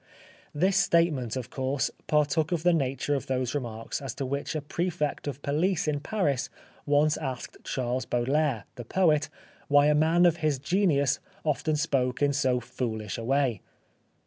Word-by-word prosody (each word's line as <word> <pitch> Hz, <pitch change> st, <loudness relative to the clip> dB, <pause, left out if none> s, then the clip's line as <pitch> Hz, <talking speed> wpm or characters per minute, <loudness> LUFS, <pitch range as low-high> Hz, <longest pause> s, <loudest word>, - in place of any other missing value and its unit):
This 185 Hz, +6 st, +2 dB
statement, 165 Hz, -, +2 dB
of 130 Hz, -3 st, -5 dB
course, 130 Hz, 0 st, -1 dB, 0.2 s
partook 150 Hz, +1 st, +2 dB
of 170 Hz, -2 st, -1 dB
the 175 Hz, 0 st, +4 dB
nature 135 Hz, -1 st, 0 dB
of 140 Hz, -, -2 dB
those 130 Hz, -2 st, -1 dB
remarks 115 Hz, -5 st, -4 dB
as 135 Hz, -4 st, -5 dB
to 135 Hz, -, -3 dB
which 140 Hz, +4 st, -3 dB
a 155 Hz, -, -1 dB
Prefect 160 Hz, -2 st, -2 dB
of 140 Hz, 0 st, -5 dB
Police 160 Hz, +5 st, +1 dB
in 150 Hz, -1 st, 0 dB
Paris 145 Hz, -, -1 dB, 0.4 s
once 150 Hz, +1 st, +3 dB
asked 130 Hz, -5 st, -5 dB
Charles 125 Hz, 0 st, -2 dB
Baudelaire, 130 Hz, -1 st, 0 dB
the 120 Hz, -, -5 dB
poet, 155 Hz, +2 st, +2 dB, 0.4 s
why 145 Hz, 0 st, +5 dB
a 150 Hz, -, +4 dB
man 160 Hz, +4 st, +4 dB
of 170 Hz, -1 st, +4 dB
his 155 Hz, -4 st, +1 dB
genius 140 Hz, -3 st, +2 dB, 0.2 s
often 155 Hz, 0 st, 0 dB
spoke 135 Hz, -5 st, 0 dB
in 145 Hz, -1 st, +2 dB
so 130 Hz, -3 st, +2 dB
foolish 115 Hz, -4 st, -4 dB
a -, -, -5 dB
way. 135 Hz, -2 st, +1 dB
145 Hz, 165 wpm, -27 LUFS, 130-155 Hz, 0.4 s, why